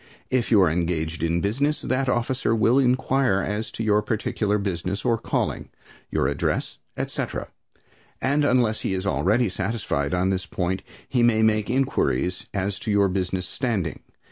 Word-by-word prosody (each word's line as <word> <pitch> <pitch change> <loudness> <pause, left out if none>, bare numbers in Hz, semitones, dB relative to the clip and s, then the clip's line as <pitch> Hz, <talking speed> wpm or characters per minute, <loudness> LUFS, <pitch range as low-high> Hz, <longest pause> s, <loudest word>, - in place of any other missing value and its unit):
If 130 -2 +1
you 110 - +5
are 90 - +4
engaged 85 -1 -1
in 85 +1 +1
business, 140 +9 0
that 130 0 0
officer 120 -1 0
will 115 +4 +4
inquire 130 -5 +2
as 105 +2 -3
to 115 - -3
your 105 -1 +3
particular 105 -1 -1
business 95 -1 -3
or 115 - +3
calling, - - -2 0.4
your - - 0
address, 70 - -1 0.2
etc., - - -3 0.7
and 145 +3 +1
unless 125 -5 +2
he 95 - -1
is 95 +1 -3
already 105 +5 +2
satisfied 95 -7 -1
on 90 +2 +1
this 95 0 -2
point, 95 +1 -2 0.3
he 125 - +1
may 115 -2 +4
make 110 -1 +2
inquiries 90 - 0
as 100 -1 -2
to - - -5
your 100 -1 +3
business 90 -1 -2
standing. 110 - -2
105 Hz, 160 wpm, -24 LUFS, 95-120 Hz, 0.7 s, you